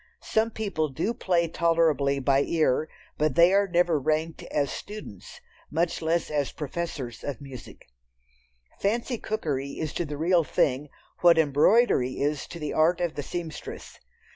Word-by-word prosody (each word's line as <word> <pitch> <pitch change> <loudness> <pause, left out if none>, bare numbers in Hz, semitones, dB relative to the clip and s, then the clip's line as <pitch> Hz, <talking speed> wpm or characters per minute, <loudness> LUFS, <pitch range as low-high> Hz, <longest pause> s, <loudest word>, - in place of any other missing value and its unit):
Some 220 +1 +1
people 200 -9 -2
do 195 - -2
play 175 -6 +1
tolerably 160 -4 +2
by 135 0 +2
ear, 155 -1 +1 0.3
but 150 -3 +1
they 170 +2 +6
are 200 0 +4
never 175 -3 +2
ranked 155 +3 -1
as 140 -2 0
students, 205 - -9 0.3
much 165 +2 -1
less 165 0 0
as 145 -2 0
professors 150 -6 -5
of 145 -4 -4
music. 135 -4 -11 0.9
"Fancy" 230 +4 -1
cookery 140 -10 -3
is 155 -2 -4
to 175 - -2
the 145 -1 -5
real 170 +2 +3
thing 145 0 0 0.3
what 170 -2 +6
embroidery 150 - +4
is 145 0 -1
to - - -8
the 150 -3 -4
art 165 +3 +3
of 175 -2 -1
the 145 - -4
seamstress. 165 +2 -7
160 Hz, 150 wpm, -26 LUFS, 145-175 Hz, 0.9 s, they